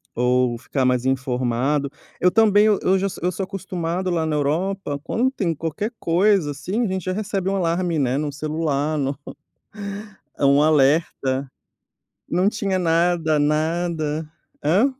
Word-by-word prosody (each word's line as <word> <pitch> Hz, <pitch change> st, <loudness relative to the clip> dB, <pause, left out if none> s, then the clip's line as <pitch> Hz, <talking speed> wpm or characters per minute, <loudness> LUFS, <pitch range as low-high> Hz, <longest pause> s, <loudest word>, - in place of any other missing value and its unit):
ou 125 Hz, 0 st, +2 dB
ficar 130 Hz, +1 st, -2 dB
mais 125 Hz, 0 st, +1 dB
informado. 130 Hz, +2 st, 0 dB, 0.3 s
Eu 180 Hz, -, +5 dB
também, 215 Hz, -1 st, +5 dB
eu 195 Hz, -2 st, +3 dB
já 195 Hz, -, 0 dB
so 190 Hz, -, -9 dB
eu 180 Hz, -, +1 dB
sou 195 Hz, -, -4 dB
acostumado 185 Hz, -2 st, -3 dB
lá 165 Hz, -2 st, 0 dB
na 155 Hz, -1 st, -1 dB
Europa 155 Hz, +1 st, -1 dB
quando 255 Hz, +8 st, 0 dB
tem 170 Hz, -, -1 dB
qualquer 165 Hz, +9 st, -3 dB
coisa, 180 Hz, -2 st, +2 dB
assim, 185 Hz, -, -2 dB
a -, -, 0 dB
gente 190 Hz, -1 st, -3 dB
já 185 Hz, -, -1 dB
recebe 195 Hz, -2 st, -2 dB
um 195 Hz, -, 0 dB
alarme, 170 Hz, -2 st, 0 dB
né, 130 Hz, 0 st, +1 dB
no 150 Hz, -1 st, -2 dB
celular, 155 Hz, 0 st, -1 dB
no 135 Hz, -1 st, -1 dB, 1.2 s
é, 140 Hz, -, +1 dB
um 140 Hz, +1 st, +5 dB
alerta. 140 Hz, -3 st, +2 dB, 0.8 s
Não 180 Hz, +4 st, +2 dB
tinha 200 Hz, -3 st, -1 dB
nada, 165 Hz, -2 st, +2 dB
nada. 155 Hz, 0 st, 0 dB, 0.4 s
Hã? 190 Hz, -, +4 dB
165 Hz, 150 wpm, -22 LUFS, 140-185 Hz, 1.2 s, Eu